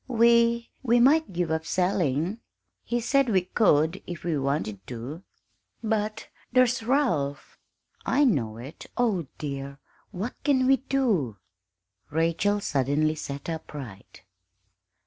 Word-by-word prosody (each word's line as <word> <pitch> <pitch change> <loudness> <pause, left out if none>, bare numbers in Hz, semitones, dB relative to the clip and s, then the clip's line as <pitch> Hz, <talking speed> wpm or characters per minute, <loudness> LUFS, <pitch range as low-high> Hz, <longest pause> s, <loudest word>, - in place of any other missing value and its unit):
"We 235 -1 +3
we 240 -2 +3
might 300 +4 +4
give 175 -2 -1
up 160 0 0
selling 180 - 0 0.4
he 240 - -1
said 270 +2 +2
we 190 -4 +3
could 175 -3 +2
if 175 -2 -7
we 170 -2 0
wanted 140 -7 -1
to." 125 +7 -6 0.6
"But 215 0 -1 0.2
there's 255 -1 +3
Ralph!" 225 - 0 0.4
"I 285 +3 +2
know 120 - +1
it. 130 +7 -10
Oh, 210 - +1
dear 140 -1 -5 0.3
what 205 +7 -4
can 270 -3 +3
we 270 +1 +5
do?" 225 - 0 0.7
Rachel 165 +6 +1
suddenly 145 0 +1
sat 140 -2 -6
upright. 145 - -8
180 Hz, 120 wpm, -26 LUFS, 145-235 Hz, 0.7 s, we